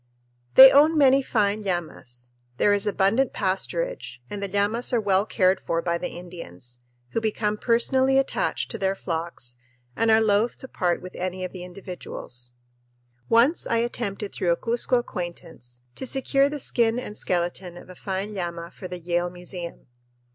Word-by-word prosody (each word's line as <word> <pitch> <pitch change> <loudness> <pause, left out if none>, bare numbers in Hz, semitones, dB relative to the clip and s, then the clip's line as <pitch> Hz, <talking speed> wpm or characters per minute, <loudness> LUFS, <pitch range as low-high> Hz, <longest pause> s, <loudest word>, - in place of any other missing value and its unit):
They 265 0 +12
own 305 +3 +5
many 275 -1 +6
fine 210 -4 0
llamas. 155 -10 -5 0.3
There 205 - +4
is 205 0 +1
abundant 205 +6 +2
pasturage 480 - -2
and 205 -1 -4
the 200 - -2
llamas 205 +5 0
are 240 - +4
well 200 -1 +2
cared 190 -3 +2
for 165 - -1
by 170 0 -1
the - - -3
Indians, 125 - -10 0.3
who 225 - -2
become 215 -1 0
personally 260 +4 +3
attached 270 - 0
to 225 - -5
their 190 0 +1
flocks 165 -9 -5 0.4
and 230 - +1
are 220 0 +6
loath 220 +1 +2
to 260 - -9
part 180 -8 -1
with 185 - -8
any 185 0 -3
of 185 - -6
the 180 -2 -7
individuals. 175 -9 -7 0.8
Once 245 +9 +3
I 230 - +1
attempted 225 -4 -3
through 175 - -1
a 170 - +2
Cuzco 240 +2 +1
acquaintance 170 - -6
to 265 - -5
secure 275 +1 +2
the 295 0 -4
skin 235 -3 +2
and 250 -4 -5
skeleton 175 -1 -2
of - - -12
a 185 - -11
fine 195 +3 -4
llama 170 -2 -5
for 185 - -8
the 180 0 -6
Yale 175 +1 -1
Museum. 175 -1 -8
195 Hz, 170 wpm, -25 LUFS, 175-230 Hz, 0.8 s, They